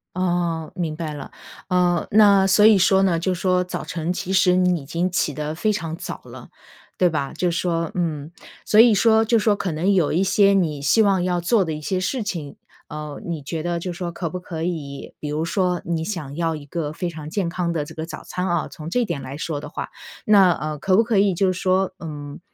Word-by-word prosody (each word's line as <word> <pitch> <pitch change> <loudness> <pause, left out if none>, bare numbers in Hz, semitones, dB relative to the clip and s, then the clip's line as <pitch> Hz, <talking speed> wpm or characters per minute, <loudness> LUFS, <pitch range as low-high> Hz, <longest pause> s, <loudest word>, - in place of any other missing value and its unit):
哦， 175 -3 -1
明 165 -4 -2
白 155 -2 -4
了， 145 -2 -8 0.4
呃 180 -1 +2
那 200 -2 +6
所 195 +2 +5
以 215 -2 +7
说 190 +1 +4
呢， 180 -3 +2
就 185 +2 0
说 180 0 +1
早 180 - -5
晨 165 +1 -3
其 185 +1 -4
实 185 -1 +4
你 180 -2 +2
已 - - -12
经 170 +5 -1
起 155 -4 0
得 150 +2 -4
非 215 +5 +1
常 165 -5 -4
早 - - -7
了， - - -11 0.5
对 180 - +4
吧？ 140 -4 -3
就 180 - 0
说， 170 -1 -1
嗯。 160 -3 -2 0.3
所 215 - +3
以 230 -1 +8
说 220 +1 +4
就 230 +1 +3
说 210 -1 +2
可 190 - -3
能 165 +6 +1
有 180 -7 +2
一 180 +5 +2
些 200 +1 +4
你 160 -7 0
希 170 +10 +4
望 195 -4 +3
要 180 -1 0
做 195 +3 +2
的 160 - -3
一 150 - -6
些 185 +4 -1
事 245 +7 -2
情， 170 -9 -5 0.3
呃 150 -1 -6
你 170 -3 -4
觉 155 +3 -5
得 175 0 -1
就 180 +1 -4
说 175 0 -4
可 170 -1 -4
不 180 - -5
可 165 -3 -7
以 155 -5 -5
比 150 - -5
如 155 +2 -1
说 180 +1 0
你 165 -1 -2
想 160 -7 -5
要 165 -1 -1
一 150 - -9
个 155 -1 -3
非 175 +1 -3
常 155 -3 -8
健 185 -4 -1
康 170 -1 -2
的 155 - -1
这 155 +2 -11
个 160 0 -4
早 155 -2 -8
餐 180 +1 -3
啊， 175 -3 0
从 155 +1 -9
这 245 +2 +1
点 150 -8 -4
来 130 +1 -7
说 155 -2 -3
的 150 - -8
话， 160 - -6 0.4
那， 200 -4 +6
呃 155 -2 -3
可 185 +5 +1
不 225 - +5
可 225 -3 0
以 195 -1 +4
就 185 +2 +2
是 185 - -5
说， 190 0 +1
嗯 145 -3 -7
175 Hz, 255 characters per minute, -22 LUFS, 155-190 Hz, 0.5 s, 以